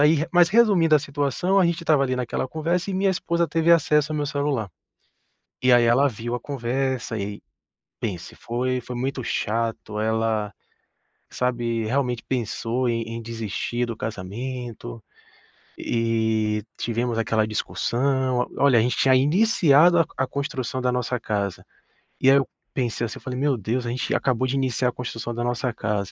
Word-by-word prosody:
aí 150 +2 +6
re 155 +1 0
mas 175 -1 +6
resumindo 195 -7 +4
a - - +6
situação, 145 +7 0
a 185 - +5
gente 170 -1 -1
estava 155 -4 +3
ali 130 -1 -1
naquela 125 0 -2
conversa, 170 +6 -1
e - - -2
minha 195 +1 +2
esposa 170 -2 0
teve 165 +1 +3
acesso 150 -2 +3
ao - - -2
meu 145 -1 -1
celular. 140 -7 -1 0.9
E 125 - +4
aí 120 -1 +6
ela 125 +5 +4
viu 120 +1 -4
a - - -4
conversa 130 -2 -2
e 100 0 -5 0.6
pense, 90 -6 -5
foi 125 +2 -2
foi 125 +1 -7
muito 130 +1 -2
chato, 110 -1 -2
ela, 110 -1 0 0.8
sabe, 120 -2 -1
realmente 125 0 -1
pensou 120 0 -1
em 115 -1 0
em 115 +1 -6
desistir 115 +1 -3
do 115 - -5
casamento, 110 - -6 0.8
e 110 -2 0
e - - -9
tivemos 120 0 -1
aquela 110 -1 +1
discussão. 130 +4 0 0.2
O - - 0
olha, 135 -4 +6
a - - +4
gente 125 +1 0
tinha 130 - +4
iniciado 170 +1 +4
a 165 - +4
a 135 - +1
construção 130 -2 -3
da 125 - +1
nossa 125 0 -1
casa. 100 -4 -3 0.6
E 130 - +5
aí 140 - +6
eu 135 - +1 0.3
pensei 120 -3 -1
assim, 115 - -6
eu - - -12
falei: 125 -1 -5
"Meu 140 -2 +1
Deus 120 +4 -2
a - - -2
gente 125 +2 -2
acabou 130 -1 +1
de 130 - -1
iniciar 130 -2 +1
a - - -4
construção 120 -1 -5
da 120 - -2
nossa 120 0 -1
casa. 105 -4 -2
125 Hz, 175 wpm, -24 LUFS, 115-140 Hz, 0.9 s, aí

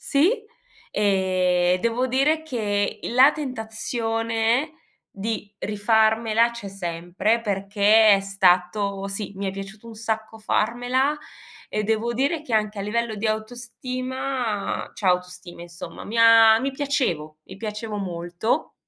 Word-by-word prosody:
Sì, 305 +8 +3 0.6
ehm, 185 -3 +2
devo 235 +2 0
dire 280 +5 +2
che 210 -9 -2
la 260 +5 +5
tentazione 225 0 -1 0.4
di 210 0 -5
rifarmela 220 +2 +2
c'è 205 -4 -7
sempre, 185 +4 -1
perché 205 +1 +4
è 195 - +1
stato 195 +1 +1
sì, 200 0 -5
mi 200 0 -3
è - - 0
piaciuto 195 +3 -9
un 225 - -10
sacco 220 0 -4
farmela 245 +6 0 0.5
e 215 - -2
devo 225 +2 0
dire 280 +6 0
che 250 -7 -3
anche 215 -1 0
a - - -2
livello 225 +2 -2
di 215 +2 -2
autostima 245 +1 -3
cioè 200 - -4
autostima 180 -1 -1
insomma 170 -1 -9
mi 220 - -6
ha 225 -1 +7
mi 275 - -1
piacevo 245 - -2
mi 190 - -11
piacevo 210 0 -5
molto. 175 +3 -2
220 Hz, 125 wpm, -23 LUFS, 195-235 Hz, 0.6 s, ha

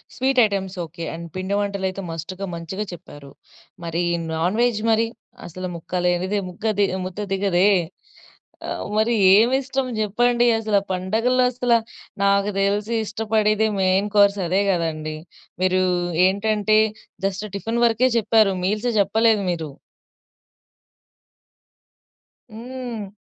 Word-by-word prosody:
Sweet 260 0 +1
items 195 -2 -3
okay. 165 +1 -9
And 170 +1 -7
పిండి 190 +2 -2
వంటలైతే 195 -1 -2
మస్ట్‌గా 180 +4 -5
మంచిగా 170 +5 -5
చెప్పారు. 145 -4 -12 0.5
మరి 170 +1 -2 0.3
నాన్ 175 +6 0
వెజ్ 240 -3 +1
మరి? 225 +1 +2 0.4
అసలు 185 +2 -6
ముక్క 175 +2 -4
లేనిదే 180 +3 +1
ముగ్గ 180 +5 -10 0.4
ముద్ద 185 +2 -7
దిగదే. 195 -1 +2 1.0
ఆ! - - -4 0.3
మరి 225 +2 +2 0.2
ఏమిష్టం 260 +4 +2
జెప్పండి 240 +3 +2
అసల 215 -2 +1
ఆ - - -29
పండగల్లో 225 +7 +1
అసలా 240 -1 +2 0.4
నాకు 200 +1 +2
తెలిసి 205 +3 0
ఇష్టపడేది 215 0 +1
మెయిన్ 190 +2 +2
కోర్స్ 200 0 +5
అదే 190 +4 +2
కదండీ! 155 -3 -2 0.5
మీరు 185 0 +2 0.5
ఏంటంటే 215 +2 +1 0.5
జస్ట్ 195 +2 -2
టిఫిన్ 225 +4 -2
వర‌కే 235 +3 +3
జెప్పారు. 220 -2 +3
మీల్స్ 215 +5 0
జెప్పలేదు 215 +1 +3
మీరు. 160 -4 -4 2.8
హ్మ్. 235 -3 -7
200 Hz, 115 wpm, -22 LUFS, 185-225 Hz, 2.8 s, కోర్స్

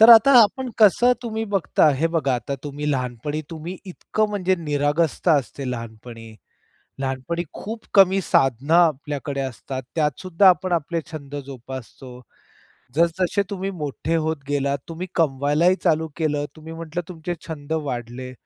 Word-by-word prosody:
तर 225 +2 +10
आता 230 +4 +9
आपण 255 +5 0
कसं 230 +4 +6
तुम्ही 225 -2 -3
बघता 180 -4 +3
हे 155 +5 +1
बघा 140 -5 +2
आता 125 +3 -3
तुम्ही 145 +1 -3
लहानपणी 130 +3 -2
तुम्ही 165 +3 -6
इतकं 215 +4 -1
म्हणजे 190 -3 +1
निरागसता 150 +2 +1
असते 135 +1 -7
लहानपणी. 115 -1 -8 0.7
लहानपणी 135 +6 -2
खूप 220 +2 -7
कमी 195 -1 +6
साधनं 135 -1 +2
आपल्याकडे 145 -4 +1
असतात. 130 +1 -5
त्यात 150 -4 0
सुद्धा 185 +1 +5
आपण 185 0 +1
आपले 170 0 0
छंद 145 -2 -7
जोपासतो. 130 -1 -9 0.7
जसजसे 170 +5 +2
तुम्ही 195 -1 -3
मोठे 155 -2 -3
होत 160 0 0
गेलात, 140 -1 0
तुम्ही 170 +3 -5
कमवायलाही 150 +3 +2
चालू 160 -2 +2
केलं. 150 -3 0
तुम्ही 160 +1 -10
म्हटलं 165 +1 -5
तुमचे 175 0 -5
छंद 150 -1 -6 0.2
वाढले. 125 +1 -5
155 Hz, 140 wpm, -23 LUFS, 135-180 Hz, 0.7 s, तर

